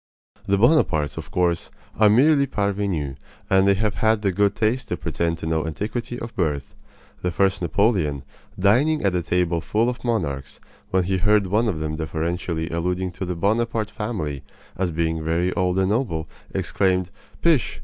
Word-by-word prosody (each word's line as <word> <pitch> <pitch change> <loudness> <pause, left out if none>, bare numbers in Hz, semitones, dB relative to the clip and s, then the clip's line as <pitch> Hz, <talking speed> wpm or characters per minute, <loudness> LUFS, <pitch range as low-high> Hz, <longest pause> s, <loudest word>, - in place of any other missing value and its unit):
The 100 - +3
Bonapartes, 100 - +3
of - - -6
course, 85 -2 0 0.3
are 110 -1 +7
merely 140 +5 +5
parvenus, 100 - -1 0.3
and 95 0 +5
they 100 - +5
have 105 +1 0
had 110 -1 +2
the 100 - +2
good 100 +2 +2
taste 115 +4 0
to - - -2
pretend 85 -1 -1
to 80 - -7
no 80 0 0
antiquity 115 +9 -4
of 115 -1 -7
birth. 75 - -1 0.5
The 90 - 0
first 95 +2 +1
Napoleon, 85 - +1 0.3
dining 130 +11 +3
at 100 -2 +2
a 90 - +1
table 85 -1 0
full 110 +7 +1
of 125 - -10
monarchs, 80 - -2 0.3
when 95 -1 +2
he 95 +1 0
heard 105 +2 +3
one 105 +5 +1
of 95 -7 -1
them 75 0 -3
deferentially 80 +1 -2
alluding 90 +2 -1
to 95 +2 -5
the 90 0 -3
Bonaparte 110 +3 0
family 100 - -4 0.3
as 95 -1 0
being 80 0 -1
very 85 +3 0
old 90 -1 0
and 95 0 +2
noble, 105 -10 -1 0.3
exclaimed: 95 -2 0 0.3
"Pish! 165 -7 +2
95 Hz, 170 wpm, -23 LUFS, 85-110 Hz, 0.5 s, are